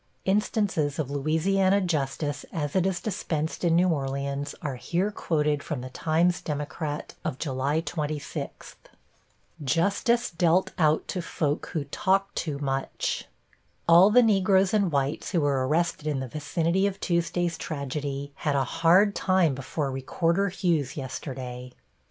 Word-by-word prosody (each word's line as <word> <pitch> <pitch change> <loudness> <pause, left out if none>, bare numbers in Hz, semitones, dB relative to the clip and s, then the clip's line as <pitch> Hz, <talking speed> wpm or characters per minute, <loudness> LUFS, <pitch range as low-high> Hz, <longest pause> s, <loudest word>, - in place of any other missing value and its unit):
Instances 190 -7 +1
of 145 -4 -2
Louisiana 185 +7 +2
justice 150 -4 -1
as 145 -4 -3
it 190 0 +3
is 185 -2 -1
dispensed 165 -7 -3
in 170 -2 +3
New 180 +2 +4
Orleans 140 -1 -2
are 140 -4 -3
here 180 +10 -1
quoted 150 -6 0
from 145 -5 -4
the 130 0 -7
Times 165 +5 +1
Democrat 150 0 -4
of 130 - -3
July 140 +2 -1
26: 150 -4 -5 0.9
+Justice 200 - +1
Dealt 175 +2 +2
Out 155 -1 +3
to 180 - -2
Folk 150 -3 -2
Who 155 - -1
Talked 195 +7 0
Too 150 -4 -2
Much+ 135 -1 -2 0.6
All 170 +4 +8
the 245 +3 +6
Negroes 195 -3 +3
and 200 -5 +2
whites 140 +6 -1
who 170 - +3
were 135 -3 +1
arrested 155 0 0
in 145 -3 0
the 130 - -4
vicinity 165 +7 0
of 195 -1 -4
Tuesday's 170 -1 0
tragedy 140 -2 -4
had 145 -2 0
a 135 - +3
hard 180 +9 +4
time 185 -7 +2
before 135 +2 -3
Recorder 165 +8 0
Hughes 170 -8 0
yesterday. 125 -2 -6
160 Hz, 140 wpm, -27 LUFS, 140-185 Hz, 0.9 s, All